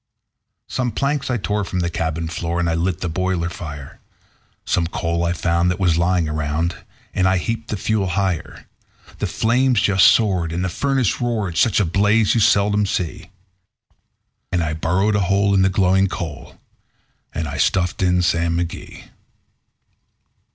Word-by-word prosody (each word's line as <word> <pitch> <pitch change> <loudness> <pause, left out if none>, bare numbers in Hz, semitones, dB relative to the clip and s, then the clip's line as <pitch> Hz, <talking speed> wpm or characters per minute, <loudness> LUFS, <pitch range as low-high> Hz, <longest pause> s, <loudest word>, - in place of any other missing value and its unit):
Some 125 -2 -2
planks 140 +4 -1
I 125 - +1
tore 105 0 -1
from 90 -1 -3
the 85 - -1
cabin 80 0 -2
floor, 85 +1 -3
and 85 - 0
I 85 - +1
lit 85 +1 -1
the 90 - -1
boiler 90 0 -1
fire; 70 -6 -8 0.7
Some 85 - +1
coal 85 0 -2
I 85 - +1
found 85 0 +1
that 90 - -2
was 90 -4 +2
lying 85 0 +1
around, 75 +3 -1 0.4
and 95 - +2
I 95 0 +3
heaped 115 +5 -3
the 105 - -3
fuel 105 0 0
higher; 95 -2 -2 0.5
The - - -1
flames 125 +1 +2
just 100 -5 +5
soared, 95 -7 +2
and 90 +2 -1
the - - -1
furnace 135 +1 0
roared 110 -8 -1
such 110 +7 +3
a 105 - +2
blaze 105 +5 +2
you 115 - +2
seldom 100 0 +3
see; 90 -4 -3 1.2
And 90 -2 +1
I 80 -1 -2
burrowed 90 +7 +1
a - - +2
hole 100 0 +2
in 95 - +4
the 95 - +4
glowing 95 0 +3
coal, 85 -5 -7 0.7
and 80 -2 -3
I 75 0 -5
stuffed 90 +2 +1
in 90 -1 +2
Sam 85 0 +1
McGee. 85 -1 -5
90 Hz, 165 wpm, -20 LUFS, 85-100 Hz, 1.2 s, just